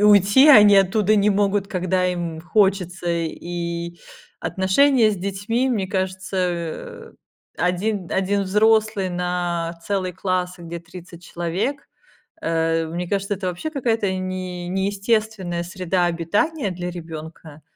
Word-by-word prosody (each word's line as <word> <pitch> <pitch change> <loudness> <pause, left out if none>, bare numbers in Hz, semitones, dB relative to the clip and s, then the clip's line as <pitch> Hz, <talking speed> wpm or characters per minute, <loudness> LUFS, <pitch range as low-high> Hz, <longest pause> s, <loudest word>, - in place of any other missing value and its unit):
и - - 0
уйти 210 +7 +6
они 210 -7 +8
оттуда 195 +2 +3
не 210 0 +3
могут, 200 0 +1
когда 185 -1 0
им 170 -3 -3
хочется. 185 -1 +1
И 170 +1 -4 0.4
отношения 220 +5 +3
с 205 - -3
детьми, 200 +7 -1
мне 205 -6 0
кажется, 185 - -3 0.4
1 180 +1 -1
1 195 +1 +1
взрослый 210 -1 +2
на 175 -1 -2
целый 190 -3 -1
класс, 180 0 -2
где 170 0 -7
30 175 0 -12
человек, 175 +11 -3 0.5
э, 165 - 0
мне 175 +2 -4
кажется, 200 +1 -1
это 190 -1 -5
вообще 180 - -4
какая-то 230 -8 0
не 185 -1 -4
неестественная 195 -1 -1
среда 180 0 -1
обитания 200 - 0
для 180 0 -4
ребенка. 160 -2 -9
185 Hz, 120 wpm, -22 LUFS, 175-205 Hz, 0.5 s, они